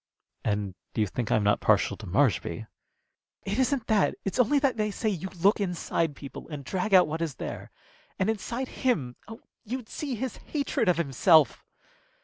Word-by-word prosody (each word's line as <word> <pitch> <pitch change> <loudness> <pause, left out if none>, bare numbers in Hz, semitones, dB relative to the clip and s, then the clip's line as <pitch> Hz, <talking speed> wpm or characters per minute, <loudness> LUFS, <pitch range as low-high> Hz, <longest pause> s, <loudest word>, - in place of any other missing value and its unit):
"And 105 -2 -1 0.2
you 110 - +2
think 110 +3 -3
I'm 110 - +3
not 105 0 +3
partial - - +3
to - - -9
Marshby?" - - +1 0.8
"It - - -1
isn't 260 -2 +1
that. 215 -3 +2
It's 195 +5 -2
only 250 +4 +4
that 275 -4 +2
they 215 -1 0
say 220 +2 -1
you 190 -2 -3
look 200 +4 +4
inside 170 -4 -1
people 140 +2 -9
and 145 -3 -7
drag 190 +6 -2
out 180 - +7
what 160 +2 -3
is 160 -5 -2
there. - - -6 0.5
And 190 - +1
inside 230 +4 -2
him 155 - +1
oh, 225 +1 -10 0.2
you'd 240 0 -5
see 280 -4 -4
his 250 +1 -4
hatred 280 -7 -1
of 175 - +3
himself!" 155 0 +4
195 Hz, 175 wpm, -28 LUFS, 150-240 Hz, 0.8 s, out